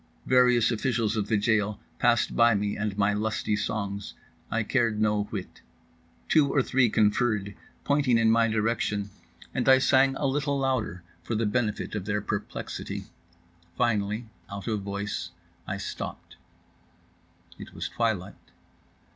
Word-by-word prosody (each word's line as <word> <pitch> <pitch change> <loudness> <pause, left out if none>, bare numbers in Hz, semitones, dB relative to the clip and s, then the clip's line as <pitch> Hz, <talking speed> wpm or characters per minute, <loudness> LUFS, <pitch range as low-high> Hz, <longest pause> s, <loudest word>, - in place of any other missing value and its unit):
Various 125 -2 +4
officials 115 -2 0
of 105 -2 -1
the 110 - +2
jail 105 -1 +1 0.2
passed 120 -2 +2
by 115 -1 +5
me 100 0 -1
and 105 -1 -3
my 100 0 +3
lusty 105 0 -1
songs; 100 -1 -3 0.3
I 115 0 0
cared 115 -2 +1
no 105 -1 +2
whit. 100 -3 -7 0.7
Two 150 -3 +4
or 135 - +3
three 130 -2 +3
conferred, 105 -1 +1 0.3
pointing 140 -4 +3
in 115 -1 +4
my 115 0 +4
direction, 105 -2 -1 0.4
and - - +1
I 130 - +8
sang 135 0 +4
a 140 - -2
little 140 +1 0
louder 130 -10 -1 0.2
for 115 - -3
the 110 +1 +1
benefit 105 0 -1
of 105 -3 -3
their 105 0 0
perplexity. 105 0 -5 0.7
Finally 105 0 0 0.2
out 100 0 -7
of 110 -3 -1
voice 100 +1 -4 0.4
I - - -3
stopped. - - -6 1.2
It - - -10
was - - -3
twilight. 105 -5 -1
110 Hz, 140 wpm, -27 LUFS, 105-120 Hz, 1.2 s, I